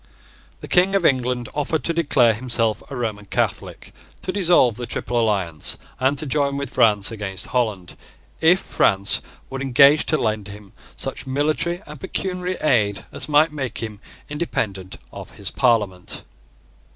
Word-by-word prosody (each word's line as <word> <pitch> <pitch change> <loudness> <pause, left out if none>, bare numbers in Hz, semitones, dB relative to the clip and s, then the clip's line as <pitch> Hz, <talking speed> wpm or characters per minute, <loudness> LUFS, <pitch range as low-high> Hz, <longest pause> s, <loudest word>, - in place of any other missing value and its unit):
The - - -7
King 185 +2 +3
of 190 -4 +2
England 125 -3 +1
offered 150 +2 -1
to 170 - 0
declare 140 -8 +3
himself 115 -2 -1
a 140 - -6
Roman 110 -4 -3
Catholic, - - -3 0.3
to - - -1
dissolve 175 - +4
the 120 +1 -6
Triple 120 -1 -2
Alliance, 95 -9 -1 0.2
and 135 +2 +2
to 155 - 0
join 140 0 0
with 140 -2 -5
France 105 -4 +3
against 100 -3 -4
Holland, 105 -8 -1 0.4
if 175 +4 +5
France 100 - +1 0.3
would 135 0 -4
engage 140 +3 +5
to 155 - +2
lend 110 -4 -1
him 100 0 -12 0.2
such - - -5
military 155 +6 0
and 150 -1 -10
pecuniary 180 +2 -3
aid 105 -9 +1
as - - -5
might 150 +2 +4
make 135 -4 -4
him 110 -3 -5 0.3
independent 105 - -3 0.2
of - - -9
his 100 - -3
parliament. 105 -8 0
125 Hz, 150 wpm, -22 LUFS, 105-150 Hz, 0.4 s, if